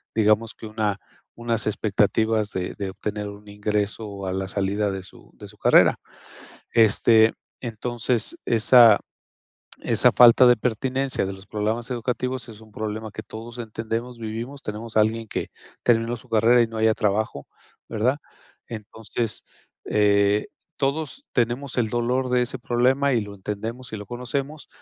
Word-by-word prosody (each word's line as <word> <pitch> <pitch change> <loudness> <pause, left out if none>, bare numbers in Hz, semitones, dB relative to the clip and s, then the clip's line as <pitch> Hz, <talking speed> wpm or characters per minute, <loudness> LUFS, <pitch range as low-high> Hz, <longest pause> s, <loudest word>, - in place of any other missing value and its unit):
digamos 110 +1 +2
que - - -10
una 105 -2 -1 0.4
unas 115 -2 -1
expectativas 105 +1 +1
de 90 -1 -3
de 100 -2 -4
obtener 105 +2 -4
un 100 +1 -12
ingreso 105 0 -3
a 95 - -2
la 95 0 -2
salida 100 +1 -1
de 95 -1 -5
su 95 - -15
de - - -11
su - - -15
carrera. - - +5 0.7
Este, 110 0 +5 0.3
entonces, 120 - -2
esa 115 -1 +6 0.8
esa - - +3
falta 120 +1 +7
de 125 -1 +6
pertinencia 130 +2 -1
de 95 - -3
los 95 +1 -12
programas 110 +4 -2
educativos 125 +1 -3
es 110 -2 -11
un 110 -1 -16
problema 110 0 -4
que 110 - -7
todos 115 +2 -9
entendemos, 115 +2 -4
vivimos, 115 +5 -6
tenemos 110 +1 -5
a - - +7
alguien 110 +1 0
que - - -4 0.3
terminó 115 0 +2
su - - -17
carrera 115 +2 +4
y 115 - +2
no 115 0 -8
halla 110 0 +3
trabajo, 105 -8 -1 0.4
¿verdad? 120 +5 0 0.5
Entonces, 110 0 -5 0.4
eh, 100 0 +3 0.3
todos 155 - -2
tenemos 125 +3 -1
el 115 -3 +1
dolor 125 +3 0
de 125 0 +3
ese 125 +1 -3
problema 130 +4 +2
y 115 - +2
lo 105 -1 -8
entendemos 110 +5 -6
y - - -3
lo 105 - -8
conocemos, 135 +6 -4
110 Hz, 150 wpm, -24 LUFS, 105-120 Hz, 0.8 s, falta